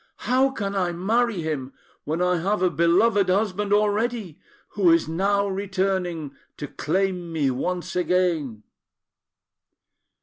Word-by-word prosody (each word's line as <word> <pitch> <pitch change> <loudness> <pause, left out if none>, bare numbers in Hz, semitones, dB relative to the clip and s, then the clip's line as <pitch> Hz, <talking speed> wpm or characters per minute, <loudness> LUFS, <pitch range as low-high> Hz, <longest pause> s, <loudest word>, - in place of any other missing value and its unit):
How 260 +2 +3
can 200 -6 -4
I 180 -3 0
marry 215 +3 0
him, 140 -4 -4 0.3
when 160 +4 -1
I 180 0 +2
have 195 +3 0
a 180 - +3
beloved 185 +6 +3
husband 205 +1 0
already, 210 -3 0 0.3
who 195 -4 +2
is 165 -1 +3
now 200 +5 +1
returning 190 -5 -2 0.2
to 145 - -5
claim 175 +4 -2
me 150 -5 0
once 180 +8 -3
again?" 170 - 0
185 Hz, 125 wpm, -24 LUFS, 165-200 Hz, 0.3 s, How